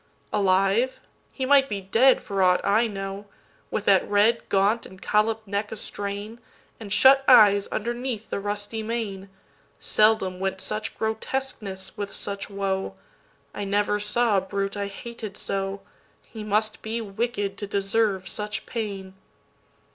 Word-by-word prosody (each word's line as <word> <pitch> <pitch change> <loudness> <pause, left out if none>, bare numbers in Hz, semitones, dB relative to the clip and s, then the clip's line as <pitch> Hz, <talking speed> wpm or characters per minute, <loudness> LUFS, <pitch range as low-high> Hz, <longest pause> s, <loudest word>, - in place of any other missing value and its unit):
Alive? 195 +6 +2 0.3
he 265 - -3
might 275 0 +5
be 205 -2 -2
dead 225 +7 +4
for 195 -1 -2
aught 180 -1 +5
I 220 +4 +3
know, 195 -1 -6 0.4
With 210 - -3
that 195 -2 +4
red, 210 +3 +3
gaunt 200 +4 +2
and 190 - -14
collop'd 220 +2 +1
neck 205 +1 -2
a - - -4
strain, 205 +2 -5 0.4
And 210 -3 -9
shut 265 +6 +6
eyes 205 -1 +7
underneath 240 0 -4
the - - -1
rusty 205 +2 -3
mane; 215 -4 -4 0.5
Seldom 215 -4 +2
went 190 0 -2
such 215 +2 -3
grotesqueness 220 -4 -4
with 205 -1 -4
such 200 0 -4
woe;I 195 - -6
never 205 +1 +1
saw 210 +1 +1
a - - +2
brute 195 +1 -3
I 200 -1 -2
hated 215 0 -8
so; 195 0 -3 0.4
He 220 -2 -9
must 215 +1 0
be 225 +1 -3
wicked 205 -1 -2
to 205 - -4
deserve 200 -1 0
such 210 0 -4
pain. 200 -5 -5
205 Hz, 140 wpm, -25 LUFS, 195-225 Hz, 0.5 s, eyes